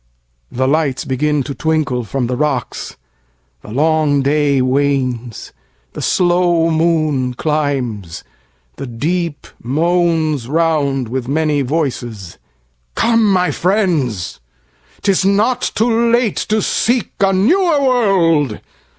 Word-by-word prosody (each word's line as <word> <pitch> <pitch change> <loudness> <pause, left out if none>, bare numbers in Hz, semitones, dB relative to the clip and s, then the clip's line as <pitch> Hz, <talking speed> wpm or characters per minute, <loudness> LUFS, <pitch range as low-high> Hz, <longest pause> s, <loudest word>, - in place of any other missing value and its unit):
The 130 +2 -1
lights 145 -2 0
begin 145 +2 0
to 140 - -5
twinkle 150 -6 -1
from 130 +3 -2
the 125 +1 -2
rocks:The 60 - -6
long 150 +1 +2
day 145 -1 +2
wanes: 130 -3 -1 0.4
the - - -6
slow 175 -2 +2
moon 155 -6 0
climbs: 125 - -2 0.5
the 135 - -6
deepMoans 160 +1 -1
round 145 -5 0
with 125 +1 -4
many 150 0 0
voices. 125 - -3 0.6
Come, 230 -3 +2
my 180 -1 +2
friends,'T 120 - -3
is 195 -1 +3
not 205 +6 +2
too 230 +1 +2
late 235 -3 +1
to 215 0 +1
seek 240 0 0
a 195 -1 +3
newer 305 - +2
world. 185 - +2
150 Hz, 105 wpm, -16 LUFS, 125-175 Hz, 0.6 s, is